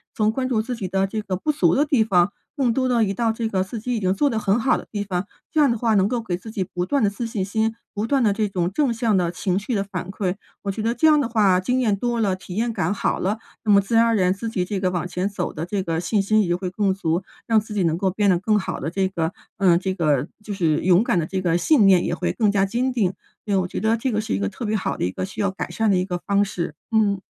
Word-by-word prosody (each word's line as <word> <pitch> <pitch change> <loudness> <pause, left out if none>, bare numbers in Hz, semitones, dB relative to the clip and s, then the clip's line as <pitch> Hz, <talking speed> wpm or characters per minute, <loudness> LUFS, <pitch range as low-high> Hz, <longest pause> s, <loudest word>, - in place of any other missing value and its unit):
从 215 0 +2
关 255 +3 -2
注 220 -3 +1
自 245 +2 -4
己 195 -5 -4
的 190 +1 +1
这 215 +2 -3
个 195 -3 -3
不 300 +12 0
足 175 - +2
的 290 +3 +3
地 275 -7 +3
方， 190 -3 +3 0.2
更 265 -5 +1
多 260 0 +1
地 235 -2 +3
移 195 -2 0
到 225 +3 +1
这 225 0 -2
个 190 -2 0
自 210 +4 -6
己 245 +3 -2
已 225 - -1
经 185 -1 +1
做 285 +9 +2
得 225 - -1
很 210 +2 +1
好 260 - +2
的 - - -9
地 205 -2 -2
方， 185 -2 -2 0.3
这 315 - +1
样 275 -4 +4
的 230 - 0
话 225 0 +1
能 195 -1 +4
够 240 +1 -1
给 180 -5 -3
自 220 +4 -10
己 200 -3 -1
不 180 -1 -4
断 275 +5 +1
的 205 - +4
自 220 +4 -5
信 215 -4 -2
心， 220 +3 0 0.2
不 205 +2 -1
断 275 +1 +2
的 210 - +4
这 215 0 0
种 180 -2 -1
正 265 +2 +1
向 225 -3 +1
的 175 -2 +1
情 180 +1 -1
绪 235 +4 -4
的 200 - 0
反 185 -2 -6
馈。 190 -2 -2 0.3
我 200 - -1
觉 215 - -5
得 230 +1 +1
这 315 +6 +3
样 305 -1 +6
的 280 - 0
话 200 -5 +3
经 250 +7 0
验 220 -5 +2
多 240 +2 -1
了、 195 -3 +1
体 185 -1 -9
验 230 +2 0
感 205 - -1
好 - - -1
了， 205 +4 -1 0.2
那 215 - +2
么 200 - +6
自 200 +4 -2
然 230 +1 +6
而 230 -1 +2
然， 185 -3 +3
自 225 +4 -5
己 185 -5 -1
这 200 +1 -3
个 185 -1 0
往 175 -1 -2
前 180 +2 -2
走 195 -4 -3
的 155 - -5
这 195 +2 -2
个 165 -3 -2
信 200 +4 +1
心 215 +2 +3
也 175 - +1
会 180 0 -4
更 195 +1 0
足， 175 -1 -1 0.2
让 225 -1 +4
自 215 0 -8
己 205 - 0
能 165 -1 +1
够 190 0 0
变 205 +1 +1
得 180 - +4
更 210 +3 +2
好 - - -4
的 - - -3
这 190 +1 +1
个 170 -2 -2 0.2
呃， 180 -3 +4
这 190 0 -2
个 150 -6 +1 0.2
就 210 - -5
是 165 -6 +1
勇 185 +3 +4
敢 185 - +1
的 165 - +1
这 190 +3 -3
个 170 -2 +2
信 210 - +4
念 185 -2 +5
也 - - -1
会 - - -1
更 215 -4 +2
加 195 -1 +2
坚 250 +5 -1
定， 205 -7 +1 0.3
因 205 -2 0
为 - - +4
我 180 - -3
觉 - - -4
得 225 +1 +2
这 255 +2 -1
个 215 0 0
是 - - -3
一 - - +1
个 100 - 0
特 - - -8
别 215 0 0
好 205 - -1
的 - - -3
一 90 - -1
个 185 - -4
需 195 - -6
要 200 - +2
改 190 - -5
善 220 -1 +1
的 190 - +3
一 180 - 0
个 180 -2 -3
方 200 0 +3
式， 170 -6 -4 0.2
嗯。 210 -3 +2
200 Hz, 335 characters per minute, -22 LUFS, 185-225 Hz, 0.3 s, 样